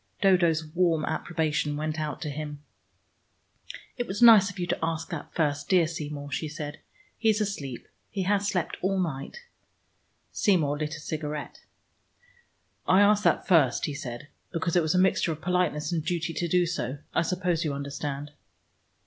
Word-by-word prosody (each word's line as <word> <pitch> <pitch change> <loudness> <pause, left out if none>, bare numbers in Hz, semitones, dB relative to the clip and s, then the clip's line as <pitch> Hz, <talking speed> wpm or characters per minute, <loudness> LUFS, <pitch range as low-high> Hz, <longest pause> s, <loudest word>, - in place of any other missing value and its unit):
Dodo's 175 -5 +3
warm 165 -1 +1
approbation 155 -3 -1
went 155 +1 -2
out 150 0 -3
to 150 - -3
him. 150 0 -6 1.3
"It 245 -1 -2
was 195 +2 -4
nice 220 -5 +8
of 200 - -10
you 180 - -1
to - - -1
ask 165 +2 -2
that 165 -4 -6
first, 145 -3 0
dear 180 -3 +5
Seymour," 150 -3 -5
she 155 - -2
said. 150 0 -6 0.4
"He 225 - +3
is 215 0 +3
asleep: 150 - -4 0.2
he 195 -3 -2
has 200 +1 +1
slept 180 -4 -1
all 190 +1 +1
night." 165 - -4 0.9
Seymour 155 -8 +2
lit 155 0 -2
a - - -8
cigarette. 150 -1 -5 1.2
"I 185 +2 +6
asked 205 0 +4
that - - +2
first," 160 -9 +4
he 150 - -3
said, 125 -1 -7 0.2
"because 170 0 -1
it 175 - +5
was 160 +2 0
a - - +4
mixture 185 -2 +3
of 155 - -10
politeness 180 -4 0
and 165 -3 -1
duty 170 0 -2
to 170 - -1
do 180 +1 +3
so. 145 -6 -3 0.2
I - - +3
suppose 175 0 0
you 155 - -1
understand." 140 +1 -4
160 Hz, 170 wpm, -27 LUFS, 150-180 Hz, 1.3 s, nice